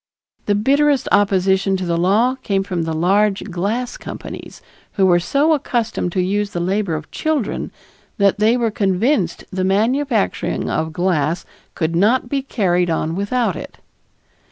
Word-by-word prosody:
The 205 - +3
bitterest 280 +5 +2
opposition 195 -1 +2
to 185 - -4
the 170 -1 0
law 205 +9 +2
came 195 -2 0
from 180 -4 -3
the 160 - -2
large 195 +5 +2
glass 215 +8 -2
companies, - - -9 0.3
who 195 - +2
were 175 -2 +4
so 285 - +2
accustomed 235 - -1
to 185 - +1
use 205 +2 -1
the 175 - -2
labor 185 0 0
of 155 0 -7
children 305 -8 -2 0.5
that 200 0 +2
they 220 +3 +3
were 230 -2 0
convinced 195 - 0
the 185 0 -2
manufacturing 225 +5 0
of 160 0 -1
glass 170 -2 0 0.3
could 165 0 -1
not 230 +7 +2
be 275 0 0
carried 180 -9 0
on 160 0 -1
without 205 0 0
it. - - -9
200 Hz, 155 wpm, -19 LUFS, 180-235 Hz, 0.5 s, were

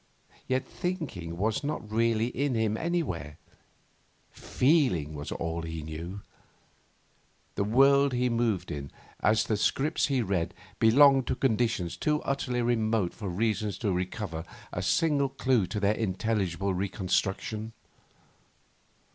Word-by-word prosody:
Yet 130 +1 0
thinking 140 - -4
was 110 +7 0
not 140 -7 -4
really 115 +1 +2
in 140 0 -1
him 110 -1 +1
anywhere; 110 - -2 0.9
feeling 125 - +1
was 75 -1 -6
all 85 0 -3
he 80 -1 -5
knew. 85 +6 -6 1.3
The 100 - 0
world 140 +6 +5
he 125 0 +1
moved 115 -5 0
in, 70 -1 -5 0.3
as 110 0 +3
the 110 - 0
script 140 +9 +1
he 135 -4 +1
read, 95 -5 -1 0.2
belonged 135 +3 +6
to - - 0
conditions 115 -8 0
too 150 0 +1
utterly 125 -3 -1
remote 110 -5 +1
for 100 -4 -5
reason 105 +2 0
to 100 +2 -2
recover 90 -2 -3 0.3
a - - -2
single 145 -4 +2
clue 130 -6 +1
to 105 - -3
their 100 +1 +3
intelligible 100 -3 -1
reconstruction. 100 +3 -2
110 Hz, 125 wpm, -28 LUFS, 95-130 Hz, 1.3 s, belonged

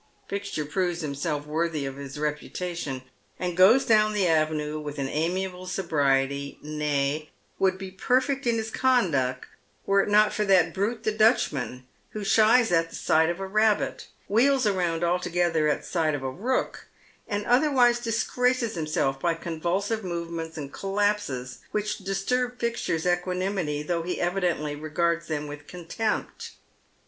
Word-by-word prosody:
Fixture 200 -6 -3
proves 175 +3 -1
himself 145 0 -3
worthy 155 -1 -1
of 135 0 -5
his 140 0 -8
reputation, 150 -1 -3 0.3
and 180 -1 -3
goes 200 +9 +6
down 215 -1 +4
the 205 -3 +1
avenue 155 -1 +1
with 150 -1 -6
amiable 180 +6 -2
sobriety, 140 -6 0
nay, 150 0 -1 0.3
would 190 -1 +2
be 190 0 -7
perfect 260 +7 0
in 235 - +3
his 225 0 -3
conduct 160 - +1 0.4
were 195 0 +4
it - - -2
not 210 +1 +5
for 210 - 0
that 185 -4 +4
brute 215 +4 -2
the 215 - +1
Dutchman, 185 - +1 0.3
who 215 - -4
shies 225 +3 +4
at 165 -1 +1
sight 160 +1 +3
of 175 +2 -3
a 195 - -3
rabbit, 215 +2 +1 0.2
wheels 250 +3 +3
round 175 -4 0
altogether 175 -2 +1
at 150 - 0
sight 160 -4 0
of 135 - -5
a 130 - -2
rook, 240 - -2 0.4
and 205 -1 -2
otherwise 245 -2 +4
disgraxies 240 +1 0
himself 155 -5 -1
by 170 +2 +1
convulsive 175 +7 -2
movements 170 -2 -5
and 140 -2 -6
collapses 195 - -1
which 210 0 -2
disturb 245 +6 -1
Fixture's 230 -8 -1
equanimity, 180 -3 -1
though 170 +2 -1
he 180 +2 -3
evidently 175 -5 0
regards 170 +2 -1
them 150 -2 -2
with 145 0 -9
contempt. 180 +5 -4
175 Hz, 145 wpm, -26 LUFS, 150-210 Hz, 0.4 s, goes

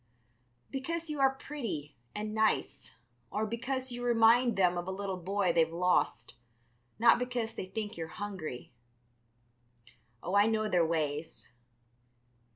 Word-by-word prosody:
"Because 330 +4 -3
you 300 - -4
are 270 0 +4
pretty 215 - -5 0.2
and 210 +1 -3
nice, 215 - 0 0.3
or 215 - -1
because 255 +4 -3
you 245 0 -5
remind 235 0 +4
them 180 -2 +4
of 175 +1 -4
a - - -2
little 195 0 -3
boy 190 0 +1
they've 165 -1 +3
lost, 170 -8 +1 0.6
not 230 +1 +6
because 245 -2 -2
they 185 - -5
think 210 +1 -5
you're 165 -1 -4
hungry. 175 - -6 1.5
Oh, 180 - -3
I 205 +1 +5
know 220 -1 +1
their 180 -4 +3
ways. 155 -3 -3
205 Hz, 135 wpm, -31 LUFS, 175-240 Hz, 1.5 s, not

